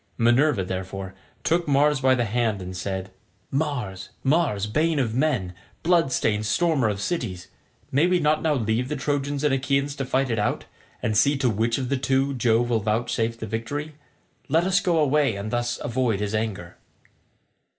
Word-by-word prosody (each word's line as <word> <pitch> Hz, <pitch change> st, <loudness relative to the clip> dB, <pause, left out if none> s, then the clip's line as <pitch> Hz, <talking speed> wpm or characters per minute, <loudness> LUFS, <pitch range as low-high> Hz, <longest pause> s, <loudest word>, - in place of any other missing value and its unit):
Minerva, 120 Hz, -1 st, +3 dB
therefore, 95 Hz, +1 st, -5 dB, 0.3 s
took 170 Hz, +1 st, +1 dB
Mars 145 Hz, 0 st, +3 dB
by 130 Hz, 0 st, +4 dB
the 120 Hz, -2 st, 0 dB
hand 110 Hz, -1 st, 0 dB
and 90 Hz, 0 st, -7 dB
said, 95 Hz, 0 st, -4 dB, 0.4 s
"Mars, 125 Hz, -11 st, -2 dB
Mars, 135 Hz, -, +2 dB
bane 155 Hz, +9 st, +1 dB
of 120 Hz, -5 st, 0 dB
men, 120 Hz, -9 st, 0 dB, 0.3 s
blood 165 Hz, -5 st, +3 dB
stained 105 Hz, -3 st, 0 dB
stormer 155 Hz, -6 st, +2 dB
of 100 Hz, -1 st, -3 dB
cities, 95 Hz, -, -3 dB, 0.4 s
may 145 Hz, +6 st, +3 dB
we 180 Hz, 0 st, +2 dB
not 155 Hz, -1 st, +2 dB
now 155 Hz, -2 st, +1 dB
leave 115 Hz, +1 st, 0 dB
the 150 Hz, -, -1 dB
Trojans 145 Hz, 0 st, -2 dB
and 150 Hz, -2 st, +3 dB
Achaeans 140 Hz, +1 st, 0 dB
to 135 Hz, -, -2 dB
fight 130 Hz, 0 st, 0 dB
it 115 Hz, -, 0 dB
out, 105 Hz, -, -1 dB, 0.4 s
and 110 Hz, -, 0 dB
see 140 Hz, +7 st, +4 dB
to 130 Hz, -3 st, +1 dB
which 115 Hz, +3 st, 0 dB
of 130 Hz, -2 st, -3 dB
the 140 Hz, -, +1 dB
two 135 Hz, +2 st, +1 dB
Jove 120 Hz, -1 st, +2 dB
will 115 Hz, -, +3 dB
vouchsafe 115 Hz, +2 st, -1 dB
the -, -, -5 dB
victory? 145 Hz, +8 st, -4 dB, 0.6 s
Let 160 Hz, +4 st, +3 dB
us 190 Hz, +1 st, +3 dB
go 175 Hz, -3 st, +1 dB
away, 145 Hz, -5 st, +2 dB
and 100 Hz, +2 st, -5 dB
thus 120 Hz, 0 st, -1 dB
avoid 120 Hz, -4 st, 0 dB
his 105 Hz, 0 st, -2 dB
anger." 105 Hz, -6 st, -3 dB
125 Hz, 180 wpm, -24 LUFS, 110-145 Hz, 0.6 s, by